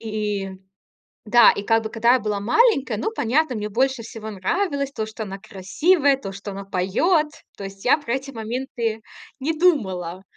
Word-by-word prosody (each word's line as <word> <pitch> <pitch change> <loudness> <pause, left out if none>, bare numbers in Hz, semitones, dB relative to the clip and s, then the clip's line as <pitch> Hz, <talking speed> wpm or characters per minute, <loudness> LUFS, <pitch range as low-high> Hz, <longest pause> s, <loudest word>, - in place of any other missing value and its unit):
И 210 -3 -3 0.8
да, 235 +3 +7
и, - - -4
как 225 +2 +2
бы, 220 - -4
когда 235 +2 +3
я 255 - +2
была 210 -1 -2
маленькая, 270 - +3
ну, 330 - -2
понятно, 295 - 0
мне 210 0 -3
больше 260 +3 0
всего 220 -1 -8
нравилось 280 - -1
то, 220 - -3
что 220 +1 -7
она 195 0 -7
красивая, 275 - +1
то, 195 -8 -7
что 200 +1 -7
она 195 0 -7
поёт. 195 - +1 0.3
То 200 - -6
есть 195 0 -9
я 250 - +5
про 275 -5 -3
эти 270 +1 -4
моменты 230 -1 -3 0.4
не 295 +5 0
думала. 190 - 0
225 Hz, 180 wpm, -22 LUFS, 200-275 Hz, 0.8 s, да